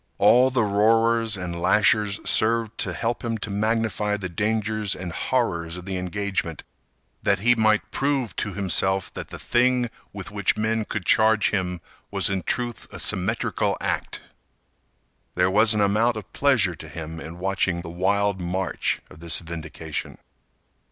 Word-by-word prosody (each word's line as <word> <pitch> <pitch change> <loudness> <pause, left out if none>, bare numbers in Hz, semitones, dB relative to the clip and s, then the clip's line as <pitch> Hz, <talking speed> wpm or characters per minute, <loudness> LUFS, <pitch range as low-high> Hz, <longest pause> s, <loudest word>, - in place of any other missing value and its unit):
All 125 +2 +5
the 125 -3 +1
roarers 115 +2 +2
and 85 -2 -5
lashers 105 0 +3
served 115 0 +3
to - - -1
help 115 +1 -2
him 115 -1 -2
to 105 - -6
magnify 110 0 0
the 95 -3 -5
dangers 110 +2 -1
and 90 -2 -6
horrors 85 -7 -1
of 90 - -9
the 95 -1 -3
engagement 90 -3 -3 0.6
that - - +2
he 120 +6 +4
might 110 -2 +3
try - - -34
to - - -5
prove 135 -4 0
to 100 - -2
himself 95 -1 0
that - - -6
the - - -8
thing 125 -1 +1 0.2
with - - -8
which - - 0
men 110 0 0
could 105 -4 -5
charge 110 -1 +4
him 90 -3 -2 0.3
was - - +2
in 95 -1 -1
truth 120 +7 -3
a - - -8
symmetrical - - +1
act. - - -3 1.1
There 90 +1 +2
was 110 +2 +5
an 105 - +1
amount 110 +4 +2
of 105 - -10
pleasure 120 -10 +3
to 80 0 -11
him 80 +1 -7
in 80 +2 -8
watching 95 -1 0
the 85 - -8
wild 100 +2 0
march 90 +2 -2
of - - -14
this 85 0 +1
vindication. 80 -2 -6
105 Hz, 165 wpm, -24 LUFS, 90-115 Hz, 1.1 s, All